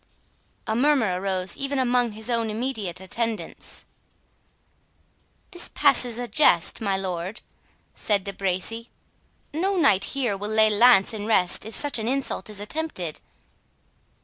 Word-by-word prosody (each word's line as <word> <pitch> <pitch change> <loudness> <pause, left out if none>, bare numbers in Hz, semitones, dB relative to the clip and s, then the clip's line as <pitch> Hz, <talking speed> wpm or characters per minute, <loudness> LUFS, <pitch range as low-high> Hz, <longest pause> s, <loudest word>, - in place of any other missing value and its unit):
A 220 - -2
murmur 240 -9 +1
arose 190 -1 -2
even 275 0 -3
among 245 -3 +1
his 220 +2 -7
own 230 -2 -1
immediate 215 -6 -4
attendants. 225 +4 -5 1.7
"This 350 -1 -1
passes 250 -5 +4
a 245 0 -3
jest, 210 - +3
my 200 -3 0
lord," 185 +2 -5 0.5
said 205 -3 -1
De 200 - -5
Bracy; 195 +5 -3 0.6
"no 380 +6 -1
knight 205 - +3
here 240 -7 0
will 205 +2 -5
lay 220 0 +4
lance 225 -1 +5
in 210 -1 -6
rest 185 -5 +3
if 225 - +1
such 290 -5 +3
an 220 - -4
insult 260 -6 -2
is 210 -2 -7
attempted." 210 - -4
220 Hz, 135 wpm, -24 LUFS, 195-250 Hz, 1.7 s, lance